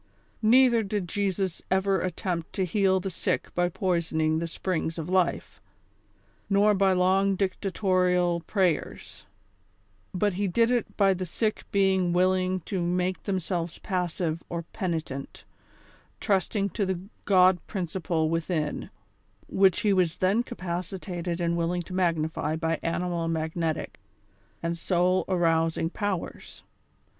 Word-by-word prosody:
Neither 235 +1 +5
did 205 -3 -2
Jesus 190 -1 -1
ever 190 0 +2
attempt 175 -2 -3
to 190 - 0
heal 190 +1 +2
the 190 +1 -4
sick - - -2
by 175 0 +1
poisoning 165 -3 0
the 170 - -2
springs 165 -1 -2
of 165 +1 -4
life, 185 -2 0 0.9
nor 205 +1 +4
by 195 -1 +3
long 190 +2 +3
dicta 195 +1 -1
torial 180 -3 +2
prayers; 185 -6 -1 0.8
but 205 +2 0
he 200 +2 -1
did 230 +6 +2
it 245 -2 -1
by 195 -2 +4
the 185 0 -4
sick 215 +5 -2
being 190 -3 +2
willing 185 +1 +2
to 185 +2 -3
make 180 +1 0
themselves 175 -3 -2
passive 175 -4 -2
or 170 0 -3
penitent, 160 -8 -4 0.8
trusting 200 +1 0
to 205 - -1
the 190 -2 -1 0.3
god 185 -2 +5
principle 175 -3 -1
within, 160 -2 -2 0.6
which 190 -2 +3
he 205 -2 +3
was 180 -3 +1
then 195 +5 +2
capacitated 180 -4 -4
and 170 -1 0
wil 170 -1 0
ling 175 0 -1
to 185 - -10
magnify 160 -4 0
by 165 0 -1
animal 170 0 -1
magnetic 160 0 -2 0.6
and 170 0 -2
soul 180 +1 +2
arousing 165 -2 +1
powers. 205 -4 -4
180 Hz, 130 wpm, -27 LUFS, 170-195 Hz, 0.9 s, Neither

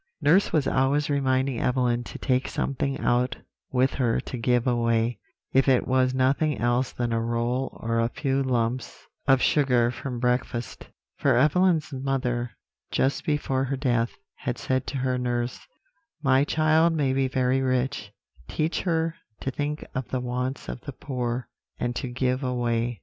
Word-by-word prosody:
Nurse 165 +6 +4
was 150 -4 +2
always 140 +3 +2
reminding 130 -2 +1
Evelyn 125 -1 +1
to - - -8
take 130 0 0
something 135 0 -2
out 125 0 +2 0.4
with 130 +1 +2
her 120 -4 +1
to - - -7
give 120 0 +1
away; 115 -2 +1 0.3
if 135 +1 +4
it 130 -2 +3
was 130 0 +3
nothing 135 +3 +2
else 120 +2 +1
than 120 -1 -2
a 115 - +1
roll 120 +3 -1
or 115 0 -1
a 115 0 +2
few 135 +1 -1
lumps 125 -2 -1 0.2
of 135 -1 +5
sugar 125 -5 +3
from 125 -1 -5
breakfast; 125 -1 -2 0.3
for 140 -4 +3
Evelyn's 155 +2 +3
mother, 130 -3 -1 0.4
just 135 +1 0
before 135 -3 0
her 135 +1 -2
death, 120 -3 0 0.2
had - - -3
said 130 0 -1
to 140 - -3
her 130 -1 0
nurse: 120 0 -2 0.6
"'My 135 0 +4
child 155 +2 +3
may 140 -4 +1
be 135 0 +2
very 130 0 +1
rich, 130 -5 -1 0.4
teach 155 +2 -1
her 165 -2 0 0.3
to 135 - -2
think 150 +3 -3
of 130 -1 -3
the 130 - -2
wants 125 +2 -3
of - - -6
the - - -7
poor, 125 -2 -3 0.3
and 120 0 -1
to 135 - -3
give 130 +2 -1
away.' 120 -2 -1
130 Hz, 160 wpm, -26 LUFS, 120-135 Hz, 0.6 s, of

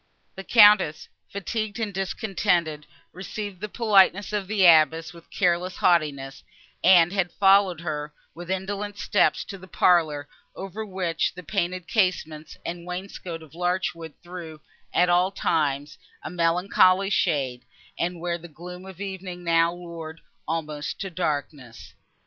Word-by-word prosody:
The 195 - -8
Countess, 205 -8 +5 0.2
fatigued 215 +3 -4
and 215 -3 -3
discontented, 180 -5 -1 0.3
received 195 +1 -7
the 210 - -4
politeness 205 -2 +3
of 205 -2 -2
the 200 -2 +2
abbess 160 0 +5
with 170 -1 -16
careless 180 0 0
haughtiness, 145 -6 +1 0.4
and 175 -1 +6
had 185 -3 0
followed 195 -3 +4
her, 150 -2 -4 0.2
with 175 +1 -10
indolent 200 +2 -3
steps, 205 +1 +2
to 195 - -8
the 185 - -13
parlour, 155 -6 +2 0.3
over 195 +3 -6
which 185 -6 -2
the 180 - -9
painted 185 -1 -2
casements 165 -8 -1
and 170 0 -6
wainscot 180 -2 -6
of 155 -2 -17
larch 180 +2 -1
wood 165 -3 -11
threw, 170 -3 -9 0.3
at 180 - +3
all 180 +1 +3
times, 145 -6 -1 0.2
a - - -6
melancholy 185 +3 +3
shade, 130 -9 0 0.3
and 175 0 -2
where 170 0 -2
the 170 - -11
gloom 180 +3 -10
of 190 -2 -11
evening 190 -3 -6
now 165 0 +3
loured 165 -2 -9 0.3
almost 155 -2 -4
to 195 - -4
darkness. 145 -7 -4
175 Hz, 140 wpm, -25 LUFS, 160-195 Hz, 0.4 s, and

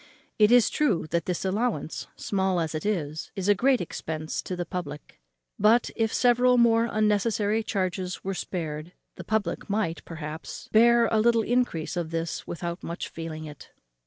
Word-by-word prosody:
It 210 +1 +6
is 245 -2 +6
true 250 - +1
that 170 -1 0
this 180 +1 -2
allowance, 195 - -1
small 190 -2 0
as 160 -2 -2
it 155 +5 -3
is, 160 -7 -2
is 195 -1 -3
a 205 - +7
great 255 +5 +3
expense 155 -2 -4
to 185 - -5
the 175 0 -3
public; 150 - -7 0.4
but, 225 +3 +4
if 225 -1 +1
several 250 0 +4
more 230 -1 +4
unnecessary 215 0 +1
charges 185 -3 -2
were 195 - -2
spared, 165 -2 -5 0.2
the - - -9
public 215 -4 -2
might, 200 -5 -1
perhaps, 160 -1 -7
bear 235 +1 +6
a 220 - +3
little 230 0 +3
encrease 240 -10 0
of 170 -2 -2
this 165 0 -3
without 170 +1 -4
much 170 - -5
feeling 160 -1 -6
it. 150 -1 -11
190 Hz, 165 wpm, -26 LUFS, 165-225 Hz, 0.4 s, a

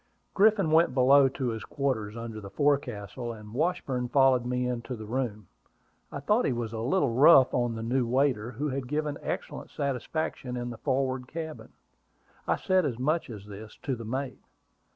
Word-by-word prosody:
Griffin 200 -4 +4
went 160 -4 +4
below 135 +1 +6
to 130 -1 -3
his 110 -1 -4
quarters 115 -6 -2
under 115 -2 -6
the 100 - -8
forecastle, 125 -5 -1
and 105 -1 -11
Washburn 130 -4 -1
followed 130 -2 +4
me 125 0 -1
into 125 +1 -4
the 110 -1 -8
room. 110 -3 -3 0.7
I - - -5
thought 210 - +2
he - - +1
was 115 -2 -3
a 110 - -4
little 135 +3 +1
rough 135 0 +7
on 120 -2 0
the 115 - -5
new 125 +1 0
waiter, 125 -3 +1
who 140 +5 -3
had 135 -1 -3
given 150 +1 -2
excellent - - -5
satisfaction 135 -1 -3
in 120 0 -4
the 115 - -9
forward 130 -2 -1
cabin. 160 0 -7 0.8
I - - +3
said 185 -1 +2
as 130 -7 -2
much 150 +5 0
as 105 -4 -8
this 105 +1 -10
to 135 -2 -1
the 115 - -8
mate. 130 +3 -4
130 Hz, 180 wpm, -28 LUFS, 115-140 Hz, 0.8 s, rough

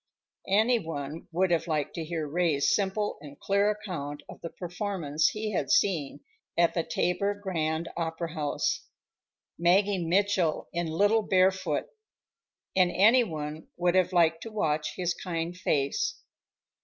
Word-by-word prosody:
Any 220 +5 +4
one 155 -3 -6
would 180 +2 +1
have 165 0 +1
liked 155 -3 -1
to 165 - -4
hear 160 -1 -3
Ray's 155 -2 +2
simple 205 +1 -1
and 145 -1 -11
clear 200 +1 +2
account 175 -9 -5
of - - -11
the 165 - -5
performance 175 -4 -1
he 215 0 -2
had 145 -9 -1
seen 165 -9 +1 0.4
at 170 -1 +4
the 170 - +1
Tabor 180 +5 0
Grand 165 -5 -2
Opera 165 0 -3
House—Maggie 175 +4 -1
Mitchell 185 -1 +1
in 170 -1 -1
Little 205 +7 +3
Barefoot—and 190 -1 +2 1.1
any 225 +8 +5
one 155 -5 -6
would 175 0 +2
have 185 0 +3
liked 165 -2 +3
to 225 - -7
watch 155 -7 -1
his 180 -1 -1
kind 170 -1 -4
face. 180 - 0
175 Hz, 135 wpm, -28 LUFS, 160-200 Hz, 1.1 s, any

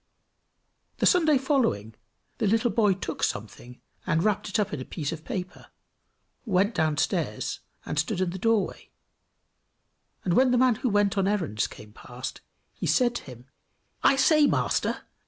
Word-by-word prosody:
The - - +1
Sunday 315 -6 +4
following, 255 - 0 0.5
the 220 - +1
little 225 +3 +2
boy 210 -4 +3
took 190 - -6
something, 110 +4 -4 0.3
and 160 +2 +1
wrapped 210 -2 0
it - - 0
up 210 -1 -1
in 140 - -3
a - - -4
piece 145 +1 -4
of 160 -1 -7
paper, 180 0 -6 0.8
went 200 0 +1
downstairs, 155 -5 -1 0.3
and 150 - -2
stood 180 +5 -1
in 185 -2 0
the 190 - -6
doorway; 225 0 0 1.4
and 180 - +1
when 255 +6 +4
the 250 - +3
man 255 0 +4
who 255 - +1
went 205 -1 +2
on 190 - +2
errands 170 - 0
came 105 0 -13
past, 125 +3 -8 0.3
he - - -4
said 245 -2 +3
to 240 - -5
him 125 -2 -11 0.6
"I - - +5
say, 300 +2 +5
master! - - 0
195 Hz, 160 wpm, -26 LUFS, 150-240 Hz, 1.4 s, I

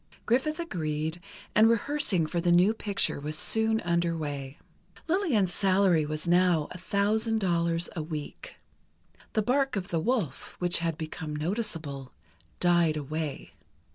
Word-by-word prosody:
Griffith 285 +7 +1
agreed, 160 - -3 0.3
and 220 +1 +6
rehearsing 230 - +1
for 170 +2 -2
the 175 0 +2
new 180 +5 +5
picture 205 -8 -1
was 150 +2 -3
soon 220 +3 +2
under 170 -1 0
way. 140 -2 -5 0.5
Lillian's 300 - +1
salary 185 -5 +3
was 155 +2 -4
now 175 -3 +3
a - - -7
thousand 215 +4 +1
dollars 170 -3 +1
a 165 - -2
week. 155 -2 -7 0.8
The 215 - +1
bark 270 +3 +1
of 195 0 -3
the 170 - 0
wolf, 205 - -2
which 175 -1 +1
had 165 -2 -2
become 155 -1 -5
noticeable, 155 - -4 0.5
died 170 -3 +3
away. 150 0 -4
175 Hz, 140 wpm, -28 LUFS, 155-215 Hz, 0.8 s, and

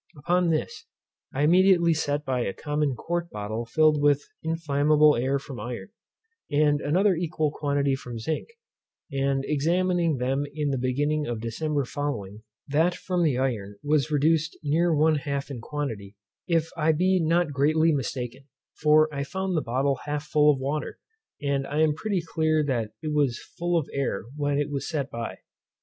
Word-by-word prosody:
Upon 175 +4 +1
this, 155 -1 -2 0.4
I 140 - -1
immediately 175 +1 +5
set 150 -1 -1
by 130 -2 0
a 100 - -2
common 150 -2 -1
quart 170 +5 -3
bottle 105 +2 -4
filled 155 +4 +3
with 145 -1 +3 0.2
inflammable 150 -2 +3
air 130 +4 +1
from 135 -2 -8
iron, 120 - -6 0.6
and 145 0 +2
another 185 +7 +3
equal 160 -3 -1
quantity 140 -2 0
from 125 -3 -5
zinc; 155 - -3 0.6
and 135 0 0
examining 170 +1 +1
them 135 +3 0
in 150 -2 0
the 135 - -1
beginning 145 +4 0
of 120 -2 -3
December 140 +5 -2
following, 115 -8 -4 0.3
that 160 +5 +2
from 180 -2 -2
the 150 -7 +2
iron 110 -7 -2
was 150 0 +2
reduced 155 +2 +1
near 165 +4 +2
one 155 0 +3
half 140 0 -3
in 125 -4 -6
quantity, 115 -8 -5 0.3
if 165 -1 +1
I 160 +1 +2
be 185 +4 +2
not 165 -1 +2
greatly 155 +4 +3
mistaken; 130 -1 -4 0.4
for 155 0 +5
I 140 0 -2
found 190 +5 -3
the 155 - +2
bottle 135 +2 0
half 145 0 -2
full 150 0 +4
of 140 - 0
water, 140 +3 -3 0.5
and 140 -1 0
I 150 +2 0
am 155 -1 +4
pretty 195 +3 -2
clear 155 -1 +1
that 120 -7 -2
it 155 -1 -2
was 140 -5 +2 0.2
full 175 0 +1
of 155 - -1
air 135 -9 -1
when 145 -1 0
it 145 0 -1
was 140 -1 -3
set 145 -3 -2
by. 115 0 -5
145 Hz, 170 wpm, -26 LUFS, 135-160 Hz, 0.6 s, immediately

